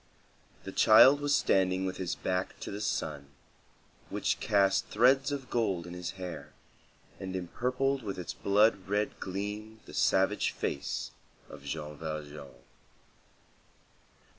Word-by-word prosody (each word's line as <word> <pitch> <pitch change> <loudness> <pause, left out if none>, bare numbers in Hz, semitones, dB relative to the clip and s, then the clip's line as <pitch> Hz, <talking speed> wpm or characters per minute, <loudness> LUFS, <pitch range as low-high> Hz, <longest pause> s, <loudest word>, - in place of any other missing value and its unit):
The - - -6
child 130 +6 +7
was 145 0 +2
standing 95 -6 +2
with 95 -1 -3
his 90 -2 -2
back 90 0 -2
to - - -5
the 100 +1 -5
sun, 75 -8 -2 0.8
which - - -1
cast 100 -1 +2
threads 135 +3 +3
of 135 -3 -5
gold 100 -8 0
in 90 - -8
his 90 0 -5
hair 90 -2 -7 0.7
and 95 0 -5
empurpled 130 +9 -1
with 100 -4 -5
its 90 - -5
blood 100 -1 +2
red 105 +1 -1
gleam 105 +3 -5
the - - -12
savage - - +2
face 70 - -3 0.4
of 70 - -11
Jean 75 0 -5
Valjean. 75 -3 -7
95 Hz, 130 wpm, -30 LUFS, 90-110 Hz, 0.8 s, child